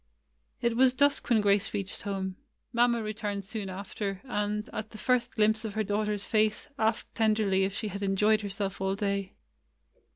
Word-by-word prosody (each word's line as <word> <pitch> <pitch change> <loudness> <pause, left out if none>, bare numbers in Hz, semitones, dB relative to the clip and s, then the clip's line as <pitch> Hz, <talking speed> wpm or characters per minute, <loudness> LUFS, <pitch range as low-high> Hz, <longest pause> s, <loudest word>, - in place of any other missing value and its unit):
It 235 -2 +1
was 255 +1 +5
dusk 285 +1 +3
when 225 -3 +4
Grace 205 +1 +2
reached 200 -1 -3
home. 190 -2 -3 0.4
Mamma 235 -1 +3
returned 210 -2 -3
soon 210 -1 -4
after; 195 +1 -4
and, 210 -4 -2
at 215 0 -4
the 215 - -11
first 250 +1 +1
glimpse 220 0 +3
of 215 -2 -5
her 220 - +1
daughter's 210 0 -1
face, 215 -1 +1
asked 220 0 0
tenderly 215 -4 +2
if 195 0 -3
she 215 - -2
had 200 +1 -6
enjoyed 210 +2 +3
herself 195 -1 -3
all 195 0 0
day. 200 -2 -2
210 Hz, 170 wpm, -29 LUFS, 200-220 Hz, 0.4 s, was